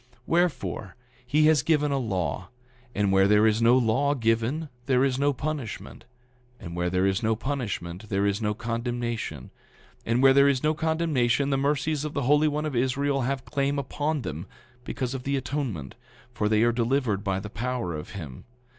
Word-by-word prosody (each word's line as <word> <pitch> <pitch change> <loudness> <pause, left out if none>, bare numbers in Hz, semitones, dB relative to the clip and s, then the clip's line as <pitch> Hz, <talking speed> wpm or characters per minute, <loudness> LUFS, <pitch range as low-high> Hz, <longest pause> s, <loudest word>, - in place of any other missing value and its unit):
9:25 - - -34 0.2
Wherefore, 145 - -1 0.3
he 150 +4 +3
has 155 -3 +5
given 150 0 +1
a 140 - +1
law; 95 -5 -2 0.5
and 100 -1 +1
where 95 0 +5
there 105 +1 +5
is 110 +1 +2
no 120 +2 +5
law 130 +4 +2
given 115 +6 0 0.2
there 130 -1 +3
is 135 -1 +1
no 145 +1 +3
punishment; 140 -4 -5 0.5
and 85 0 -8
where 90 0 0
there 90 +1 +1
is 95 +3 +1
no 110 -1 +1
punishment 110 -7 -4
there 100 0 +1
is 100 +2 0
no 105 -1 0
condemnation; 115 - -4 0.5
and 120 +3 +1
where 135 0 +7
there 140 +1 +6
is 130 -2 0
no 155 +1 +3
condemnation 150 -5 +1
the - - +2
mercies 145 +1 0
of 150 -1 -4
the 140 - 0
Holy 150 +4 +4
One 150 +1 -1
of 150 -4 -3
Israel 135 +3 +1
have 130 +1 -2
claim 140 0 -1
upon 145 +2 -2
them, 80 +1 -5 0.4
because 130 -1 -3
of 135 - -4
the 140 +2 -1
atonement; 125 - -4 0.4
for 105 -3 0
they 110 +1 +3
are 120 - +4
delivered 120 -3 0
by 95 -2 -1
the 105 +1 -8
power 120 -6 -3
of 75 +4 -7
him. 75 -10 -8
125 Hz, 190 wpm, -26 LUFS, 105-140 Hz, 0.5 s, where